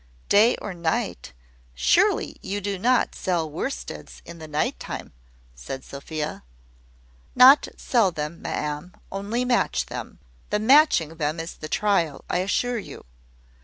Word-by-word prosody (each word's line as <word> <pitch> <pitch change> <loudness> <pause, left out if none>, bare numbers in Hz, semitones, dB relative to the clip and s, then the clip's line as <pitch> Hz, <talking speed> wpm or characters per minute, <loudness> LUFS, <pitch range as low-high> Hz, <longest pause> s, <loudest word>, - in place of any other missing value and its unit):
"Day 220 +4 +5
or 205 - -6
night! 160 - -2 0.4
Surely - - +2
you 200 +1 -3
do 200 -1 -3
not 250 +5 +2
sell 175 -3 -1
worsteds 165 - -6
in 170 - -10
the 160 - -8
night 150 0 -1
time?" - - -7 0.4
said 60 - -7
Sophia. 150 - -5 0.9
"Not 265 +3 +8
sell 230 -6 +2
them, 155 0 -5
ma'am; 150 +4 -4 0.2
only 205 +6 -2
match 245 -1 +1
them. - - -7 0.3
The 210 - +1
matching 215 - +4
them 155 +1 -1
is 165 +1 -5
the 155 - -9
trial, 170 -9 0
I - - +1
assure 230 +6 0
you. - - -10
180 Hz, 135 wpm, -24 LUFS, 155-215 Hz, 0.9 s, Not